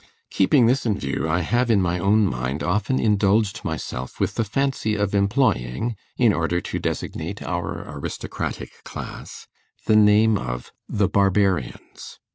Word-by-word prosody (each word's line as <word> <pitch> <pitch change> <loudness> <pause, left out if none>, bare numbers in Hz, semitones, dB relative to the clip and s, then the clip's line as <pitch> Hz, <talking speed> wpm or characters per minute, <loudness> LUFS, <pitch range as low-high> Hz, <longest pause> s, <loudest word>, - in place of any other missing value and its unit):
Keeping 120 +6 +4
this 130 +4 +2
in 105 -4 0
view, 70 +3 -2
I 85 +3 +1
have 120 +8 +1
in 110 -3 +4
my 90 -1 0
own 105 +4 +3
mind 65 -2 -2
often 105 +8 0
indulged 105 0 +2
myself 65 -5 -5
with - - 0
the - - 0
fancy 120 -1 -1
of 105 -1 -1
employing, 100 - +1 0.2
in 120 -4 +4
order 85 0 0
to - - -4
designate 85 +6 -4
our 85 -2 -4
aristocratic 70 -1 -6
class, - - -8 0.4
the 110 - +3
name 105 0 +5
of - - -5 0.2
The 100 -2 +1
Barbarians. 95 -8 0
100 Hz, 145 wpm, -23 LUFS, 85-110 Hz, 0.4 s, name